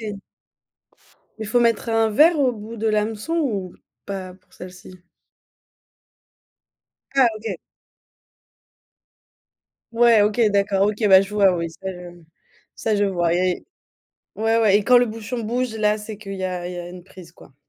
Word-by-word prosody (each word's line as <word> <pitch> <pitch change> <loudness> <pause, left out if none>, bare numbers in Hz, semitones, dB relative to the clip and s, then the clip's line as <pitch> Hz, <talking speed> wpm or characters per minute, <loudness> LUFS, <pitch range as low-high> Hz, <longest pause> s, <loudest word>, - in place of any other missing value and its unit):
Mais 210 -3 -6 1.2
il 220 - -5
faut 240 +4 +1
mettre 230 -1 +1
un 225 -1 +2
vers 310 +9 +4
au 265 -3 +2
bout 225 +1 -9
de 225 0 -1
l'hameçon 215 +7 -2
ou 205 - -2 0.3
pas 190 -2 -6
pour 190 - -28
celle-ci? 180 +1 -12 2.3
Ah 265 -2 +6
OK. 215 -4 -5 2.4
Ouais, 230 -2 +5
OK, 210 +3 0
d'accord 200 -1 +1
OK, 210 +1 -1
bah, 190 -1 +7
je 200 +1 -5
vois 195 -3 +4
oui, 170 -1 -3
ça 190 - -13
je 175 -1 -12 0.5
ça 220 -2 -1
je 205 - +2
vois. 175 -3 0
Et 180 0 0 0.7
ouais, 225 +1 +1
ouais 210 -3 +4
et - - -3
quand 250 - +5
le 245 - +5
bouchon 225 +1 -6
bouge, 245 +1 -2
là, 210 0 +1
c'est 210 0 -8
qu'il 200 -1 -9
y 190 - -5
a 180 -1 -4
il 180 - -6
y 180 - -7
a 175 0 -7
une 180 0 -11
prise 180 -3 -14
quoi. 145 -5 -19
210 Hz, 165 wpm, -21 LUFS, 185-225 Hz, 2.4 s, bah